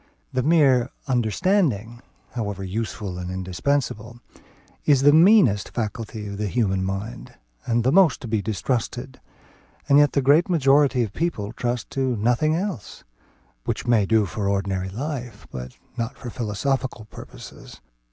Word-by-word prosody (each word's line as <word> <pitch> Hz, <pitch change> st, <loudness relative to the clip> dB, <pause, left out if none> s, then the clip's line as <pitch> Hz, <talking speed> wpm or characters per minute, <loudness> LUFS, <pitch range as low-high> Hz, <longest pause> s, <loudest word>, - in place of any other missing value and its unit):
The 130 Hz, -, +1 dB
mere 135 Hz, -4 st, +4 dB, 0.2 s
understanding, 120 Hz, -, 0 dB, 0.3 s
however 105 Hz, -5 st, -4 dB
useful 100 Hz, -1 st, -4 dB
and 90 Hz, 0 st, -5 dB
indispensable, 110 Hz, +5 st, -2 dB, 0.6 s
is 140 Hz, -3 st, +3 dB
the 145 Hz, +1 st, +7 dB
meanest 165 Hz, -, +5 dB
faculty 110 Hz, -1 st, -4 dB
in 100 Hz, -1 st, -6 dB
the 105 Hz, 0 st, -2 dB
human 95 Hz, -3 st, 0 dB
mind, 100 Hz, +6 st, -5 dB, 0.3 s
and 115 Hz, 0 st, +1 dB
the 130 Hz, -, +3 dB
most 180 Hz, -1 st, +5 dB
to 125 Hz, -, -6 dB
be 110 Hz, -2 st, 0 dB
distrusted; 120 Hz, +6 st, -3 dB, 0.7 s
and 140 Hz, 0 st, +6 dB
yet 145 Hz, -1 st, +4 dB
the 140 Hz, -, +1 dB
great 150 Hz, +7 st, +4 dB
majority 140 Hz, -5 st, +3 dB
of 105 Hz, -3 st, -5 dB
people 115 Hz, -11 st, -2 dB
trust 120 Hz, -1 st, -3 dB
to 130 Hz, -2 st, 0 dB
nothing 125 Hz, +8 st, +1 dB
else; 180 Hz, -, -5 dB, 0.6 s
which -, -, -3 dB
may 115 Hz, -5 st, +3 dB
do 110 Hz, -1 st, +3 dB
for 100 Hz, +2 st, -3 dB
ordinary 95 Hz, -1 st, -1 dB
life, 125 Hz, -1 st, -6 dB
but 65 Hz, 0 st, -8 dB, 0.2 s
not 115 Hz, +2 st, -3 dB
for 120 Hz, -, -7 dB
philosophical 120 Hz, +2 st, -2 dB
purposes. -, -, -12 dB
120 Hz, 140 wpm, -23 LUFS, 105-140 Hz, 0.7 s, the